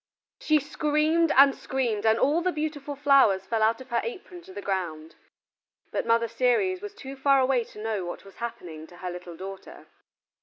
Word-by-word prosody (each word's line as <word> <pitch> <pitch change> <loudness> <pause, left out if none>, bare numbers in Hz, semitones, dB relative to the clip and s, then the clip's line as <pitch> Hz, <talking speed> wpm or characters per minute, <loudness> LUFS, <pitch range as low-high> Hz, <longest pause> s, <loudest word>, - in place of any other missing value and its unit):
She 310 -1 +3
screamed 305 +3 +1
and 275 0 +8
screamed 235 -7 -2
and 220 0 +4
all 300 +7 +2
the 365 +1 +1
beautiful 300 -2 -4
flowers 270 -9 +4
fell 225 +1 -1
out 225 +3 +2
of 260 - -13
her 235 - +1
apron 380 -6 -7
to 370 +2 -14
the - - -7
ground. 170 -6 -4 0.8
But - - -2
Mother 230 0 +3
Ceres 250 - +1
was 415 0 -8
too 270 0 -8
far 275 0 +3
away 260 -2 +2
to 210 - -14
know 215 -4 -2
what 175 +3 -7
was 195 - -15
happening 170 -9 -7
to 175 - -16
her 180 0 -5
little 175 -1 -9
daughter. 195 +1 -9
250 Hz, 190 wpm, -26 LUFS, 195-300 Hz, 0.8 s, and